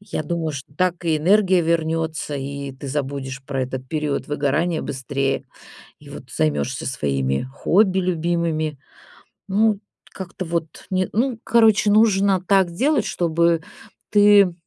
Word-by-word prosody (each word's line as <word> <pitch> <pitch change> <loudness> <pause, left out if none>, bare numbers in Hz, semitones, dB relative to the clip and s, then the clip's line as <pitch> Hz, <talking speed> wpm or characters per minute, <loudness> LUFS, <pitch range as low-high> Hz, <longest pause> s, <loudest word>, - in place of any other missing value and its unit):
Я 205 - -4
думаю, 160 0 -2
что 140 0 -9
так 180 +1 -1
и 160 -1 +2
энергия 185 +2 +3
вернётся, 160 -2 -1
и 140 0 -5
ты 130 +2 -10
забудешь 135 -1 -4
про 135 -1 -3
этот 130 0 -5
период 150 -1 -2
выгорания 150 +3 0
быстрее. 135 0 -2 0.6
И - - -14
вот - - -9
займешься 75 -2 -1
своими 70 -2 -1
хобби 190 +8 +2
любимыми. 170 -4 -1 0.7
Ну, 210 +1 +2 0.3
как-то 185 0 -7
вот, 165 -2 -4
не 185 -1 0
ну 240 +1 0
короче, 220 -3 +4
нужно 200 -3 +4
так 190 -2 +3
делать, 265 - +1
чтобы 170 -1 +1 0.5
ты 205 -3 +6
165 Hz, 130 wpm, -21 LUFS, 140-190 Hz, 0.7 s, ты